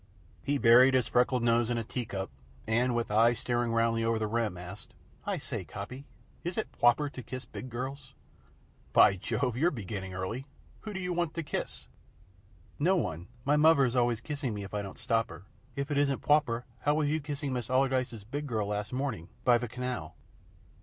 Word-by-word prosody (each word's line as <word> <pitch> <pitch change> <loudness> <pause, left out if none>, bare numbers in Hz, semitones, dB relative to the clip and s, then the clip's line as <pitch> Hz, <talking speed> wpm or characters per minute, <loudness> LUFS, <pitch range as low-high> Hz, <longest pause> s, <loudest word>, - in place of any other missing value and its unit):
He 145 +1 +1
buried 125 +2 +7
his 125 -3 +3
freckled 125 0 +2
nose 120 0 +3
in 120 - 0
a 115 - -1
tea 120 0 -4
cup 95 -7 -4 0.3
and, 120 +3 +2
with 115 -2 -1
eyes 115 +2 +4
staring 120 -1 0
roundly 115 0 +2
over 115 0 +2
the 110 - -1
rim, 110 -4 -1
asked: 90 +3 -10 0.3
"I - - 0
say, - - -4
Coppy, 125 +8 -7 0.4
is 175 +1 -3
it 220 - -2
pwoper 120 +5 +3
to 130 - -7
kiss 130 +1 -7
big 110 +5 -8
girls?" 130 +3 -6 0.8
"By 100 - +7
Jove! 120 +6 -1
You're 160 +8 +3
beginning 100 - -5
early. 115 +9 -4 0.3
Who 215 - -7
do 190 - -3
you 180 -1 -2
want 170 -2 -1
to 165 - -2
kiss?" 145 - -4 0.9
"No 180 +6 +4
one. 90 - -2 0.2
My 145 +2 +4
muvver's 140 -5 +5
always 120 -2 +2
kissing 140 -5 -3
me 100 - -4
if 100 - -9
I 105 - -1
don't 100 -2 -8
stop 115 0 0
her. - - -10 0.3
If 140 +1 -3
it 145 - +2
isn't 140 -2 +1
pwoper, 140 -6 +2
how 145 +6 +2
was 155 -1 +1
you 155 +2 +1
kissing 145 -1 -3
Major 125 -1 -3
Allardyce's 130 -4 +1
big 145 +7 -4
girl 110 -5 -1
last 105 0 -2
morning, 125 - -3
by 120 -1 +5
ve 120 - -3
canal?" 125 -10 -4
120 Hz, 195 wpm, -30 LUFS, 110-140 Hz, 0.9 s, buried